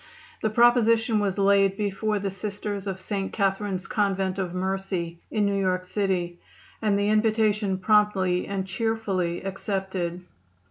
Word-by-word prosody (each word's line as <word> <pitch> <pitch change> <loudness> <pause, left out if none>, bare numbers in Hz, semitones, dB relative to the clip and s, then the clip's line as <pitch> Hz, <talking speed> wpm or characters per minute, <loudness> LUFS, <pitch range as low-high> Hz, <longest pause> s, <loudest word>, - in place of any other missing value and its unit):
The 220 - +1
proposition 230 -1 +4
was 200 -2 -1
laid 195 -1 +3
before 210 +1 -1
the 200 -1 -2
Sisters 205 +1 -4
of 190 -1 -3
St. 195 0 -3
Catherine's 195 -2 -1
Convent 195 -4 0
of 180 -2 -3
Mercy, 185 -2 -2
in 215 -2 +1
New 200 -1 +1
York 185 -1 0
City, 180 -3 -1 0.4
and 210 -2 +2
the 205 +1 +1
invitation 215 -2 +2
promptly 190 -2 +2
and 195 -1 -2
cheerfully 190 -4 -1
accepted. 190 -2 -3
195 Hz, 135 wpm, -26 LUFS, 185-210 Hz, 0.4 s, proposition